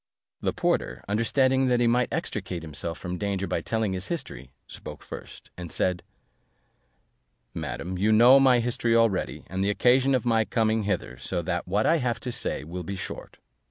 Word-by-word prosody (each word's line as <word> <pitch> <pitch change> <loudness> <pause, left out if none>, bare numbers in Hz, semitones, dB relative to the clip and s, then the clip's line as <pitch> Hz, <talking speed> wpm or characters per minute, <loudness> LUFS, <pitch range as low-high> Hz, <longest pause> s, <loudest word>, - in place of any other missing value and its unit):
The - - 0
porter, 60 +1 -1
understanding 130 +5 +2
that 125 -1 +2
he 120 - +3
might 120 +1 +2
extricate 95 - -4
himself 80 +2 -4
from 90 -1 -5
danger 100 -2 -1
by - - -2
telling 110 -3 -1
his 95 0 -4
history, 70 - -5 0.2
spoke - - -10
first, - - -10
and 90 -2 -7
said, 90 -1 0 1.5
"Madam, 90 +1 -4
you 105 +3 +3
know 120 +5 +7
my 130 -3 +5
history 115 -1 0
already, 115 -5 +1
and 95 +1 -3
the 100 - +1
occasion 130 +5 +3
of 125 - -1
my 115 -2 +3
coming 110 -1 0
hither; 90 -11 -2
so 85 +7 -3
that 85 +2 -2
what 100 +4 +1
I 165 - +4
have 125 -5 -1
to 125 - -4
say 75 - -3
will 85 +4 -6
be 95 +3 -5
very 95 - -5
short. - - -8
105 Hz, 185 wpm, -26 LUFS, 90-120 Hz, 1.5 s, know